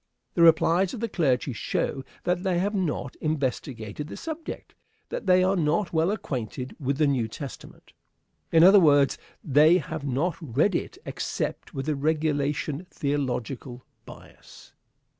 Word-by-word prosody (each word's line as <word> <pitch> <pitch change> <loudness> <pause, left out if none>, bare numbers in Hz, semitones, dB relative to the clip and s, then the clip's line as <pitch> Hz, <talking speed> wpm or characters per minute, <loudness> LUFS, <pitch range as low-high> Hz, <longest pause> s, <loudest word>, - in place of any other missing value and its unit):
The 170 - +1
replies 170 +4 +4
of - - -7
the 230 - -1
clergy 135 - 0
show 135 +4 -2 0.2
that 180 0 0
they 185 -2 0
have 200 +4 0
not 150 -9 -2
investigated 135 -4 -3
the - - -8
subject; 320 0 -7 0.4
that - - -5
they 185 0 +5
are 190 +1 +2
not 170 +3 0
well 160 +2 +2
acquainted 130 - -4
with 140 -1 -1
the 155 - +3
New 130 -6 +1
Testament. 135 +4 -10 0.6
In 165 0 +6
other 195 +3 +9
words, 145 -5 +4 0.2
they 155 +4 +5
have 150 -4 -5
not 145 +5 -1
read 155 - +1
it - - -3
except - - -4
with 135 -1 -3
the 155 -1 0
regulation 150 +1 -1
theological 130 -3 -3 0.2
bias. - - -15
150 Hz, 145 wpm, -26 LUFS, 135-175 Hz, 0.6 s, other